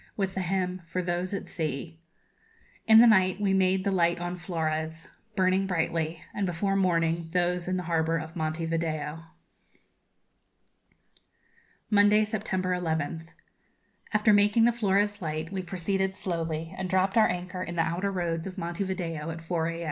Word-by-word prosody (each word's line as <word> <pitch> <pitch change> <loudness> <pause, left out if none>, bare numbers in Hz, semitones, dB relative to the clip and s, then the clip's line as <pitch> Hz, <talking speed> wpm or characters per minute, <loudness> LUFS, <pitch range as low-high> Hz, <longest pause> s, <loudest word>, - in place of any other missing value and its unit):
with 195 -2 -1
the 190 - -2
hymn, 185 0 -1
'For 180 +2 -2
those 175 +1 -2
at 200 - -4
Sea.' 160 +1 -4 0.9
In 220 0 +8
the 235 - +9
night 190 -4 +4
we 200 -2 +1
made 190 0 +2
the 200 - 0
light 170 -2 +2
on 175 +1 -4
Flores, 160 -2 -3 0.3
burning 190 0 +2
brightly, 165 -2 -1
and 200 -2 -1
before 195 +3 0
morning 165 -3 +1
those 180 0 +1
in 185 0 0
the 180 - -3
harbour 165 -1 +1
of 160 +1 -7
Monte 160 0 -2
Video. 160 -1 -3 2.7
Monday, 210 +1 +5
September 195 -4 -2
11th. 160 -2 -2 0.8
After 215 0 +4
making 205 +3 +5
the 240 - +5
Flores 205 -2 +1
light 155 0 -3
we 190 -1 -2
proceeded 190 +2 -1
slowly, 165 -3 -3
and 190 -1 -4
dropped 190 +3 +2
our 220 -1 +6
anchor 180 +1 -4
in 175 -1 -5
the 165 - +2
outer 175 +5 -1
roads 170 -2 -2
of 190 +1 -8
Monte 175 +2 -3
Video 165 -5 -3
at 165 0 -5
4 165 -1 -1
a. 165 0 -4
180 Hz, 160 wpm, -28 LUFS, 165-190 Hz, 2.7 s, the